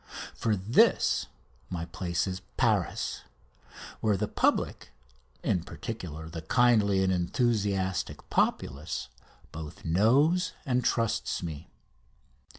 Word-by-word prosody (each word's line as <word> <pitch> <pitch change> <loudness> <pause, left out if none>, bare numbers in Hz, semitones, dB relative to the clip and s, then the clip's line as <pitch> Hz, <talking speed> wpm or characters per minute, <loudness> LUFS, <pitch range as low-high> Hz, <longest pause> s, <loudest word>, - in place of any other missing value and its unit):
For 110 -2 0
this 90 - +3 0.4
my 85 -2 -3
place 85 -1 -2
is 95 -1 -3 0.2
Paris, - - +1 0.8
where 105 -3 +2
the 105 +2 -1
public, - - 0 0.5
in 90 - +1
particular 80 -2 -6
the 80 0 -6
kindly 105 0 +3
and 95 0 +2
enthusiastic 95 -1 0
populace, 70 -4 -1 0.4
both 75 -1 -8
knows 135 - +3
and 125 -2 +1
trusts 115 -4 0
me. 80 -4 -6
95 Hz, 100 wpm, -29 LUFS, 85-115 Hz, 0.8 s, this